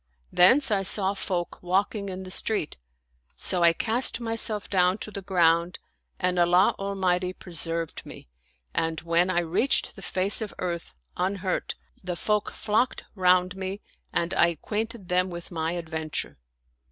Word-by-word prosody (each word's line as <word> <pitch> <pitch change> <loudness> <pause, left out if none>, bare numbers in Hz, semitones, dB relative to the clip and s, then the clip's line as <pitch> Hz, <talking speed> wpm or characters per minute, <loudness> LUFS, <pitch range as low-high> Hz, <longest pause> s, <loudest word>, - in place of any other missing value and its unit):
Thence 255 +9 +5
I 200 -2 +2
saw 195 0 +3
folk 180 -3 -4
walking 200 +3 -1
in 190 0 -6
the 185 - -8
street; 205 -4 0 0.6
so 180 - +6
I 170 0 +7
cast 230 +10 0
myself 225 -2 +1
down 180 0 +2
to 215 - -6
the 200 -1 -6
ground 170 -2 +2 0.4
and 180 -1 0
Allah 175 +2 +4
Al 200 0 -3
mighty 180 -1 0
preserved 165 -2 -4
me, - - -12 0.5
and 160 -1 -1
when 170 +2 +2
I 175 -1 +2
reached 175 +11 +1
the 195 - -11
face 195 +3 0
of 215 - -5
earth, 170 - -4 0.2
unhurt, 185 0 -2 0.3
the 180 -1 -3
folk 210 +3 0
flocked 225 +4 -1
round 185 -1 +3
me 190 +1 -5 0.3
and 170 +1 -1
I 170 - +4
acquainted 210 - -4
them 180 +1 +1
with 170 0 -8
my 165 0 -2
adventure. 160 - -4
185 Hz, 155 wpm, -26 LUFS, 175-200 Hz, 0.6 s, I